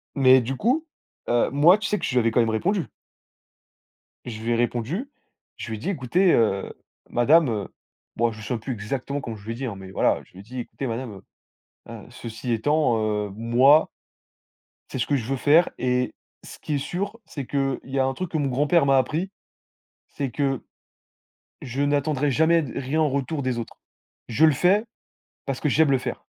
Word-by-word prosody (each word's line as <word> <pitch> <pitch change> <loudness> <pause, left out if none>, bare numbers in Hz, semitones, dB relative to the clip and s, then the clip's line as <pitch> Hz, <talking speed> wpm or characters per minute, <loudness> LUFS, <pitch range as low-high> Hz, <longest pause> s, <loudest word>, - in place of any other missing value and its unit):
Mais 130 -2 +6
du 125 +3 -3
coup, 270 +9 +1 0.4
heu, 120 0 +2
moi, 155 +8 +6
tu 210 - -3
sais 210 - 0
que - - -3
je - - -2
lui 125 - +3
avais 115 -1 +2
quand 120 - +2
même 115 -1 +3
répondu. 175 - 0 1.4
Je 110 -3 -7
lui 115 - -1
ai - - +3
répondu, 120 - -1 0.5
je - - -7
lui 110 - -3
ai - - -11
dit: 155 - -3
«Écoutez, 175 +3 +2
heu, 100 -4 +1 0.4
madame», 150 +6 +4
heu, 105 -4 -2 0.5
bon, 115 0 +2
je 110 - -11
me - - -10
souviens 120 +4 -2
plus 125 +4 -5
exactement 130 +6 -4
comment 115 -4 -6
je 100 - -16
lui 115 - -3
ai - - -7
dit, 135 +3 -4
hein, 115 -5 -4
mais 95 -1 -10
voilà, - - +1
je - - -27
lui 90 - -13
ai - - -10
dit: 125 +4 -8
«Écoutez, 130 +2 -5
madame, 120 +1 -4 0.8
heu - - -8
heu, - - -10
ceci 115 +1 -6
étant, 145 +1 +2 0.3
heu, - - -12
moi 120 +8 +4 1.0
c'est - - -4
ce - - +1
que 145 - +1
je 125 -5 -2
veux 135 +3 -1
faire, 155 +6 +4
et 125 0 0 0.3
ce - - -11
qui 150 - -3
est - - +1
sûr, 200 +9 -4
c'est 140 -4 -6
qu'il 135 -1 -1
y 135 +1 -2
a 130 - +3
un 135 - 0
truc 185 +2 -5
que 160 - -1
mon 145 -2 0
grand-père 145 +5 +2
m'a 135 0 +5
appris, 155 +8 0 0.8
c'est 135 -3 -4
que 135 -1 -1 1.0
je 130 +3 -4
n'attendrai 145 0 +1
jamais 160 +4 +3
d 125 - -7
rien 140 +4 -1
en 155 - +3
retour 140 +2 -2
des 130 -2 -1
autres. 115 - -8 0.5
Je 140 +7 +4
le 155 - +5
fais 190 - +3 0.6
parce 135 -2 -3
que 150 - +1
j'aime 150 +1 +3
le 135 - +4
faire.» 130 - -5
135 Hz, 210 wpm, -24 LUFS, 120-155 Hz, 1.4 s, Mais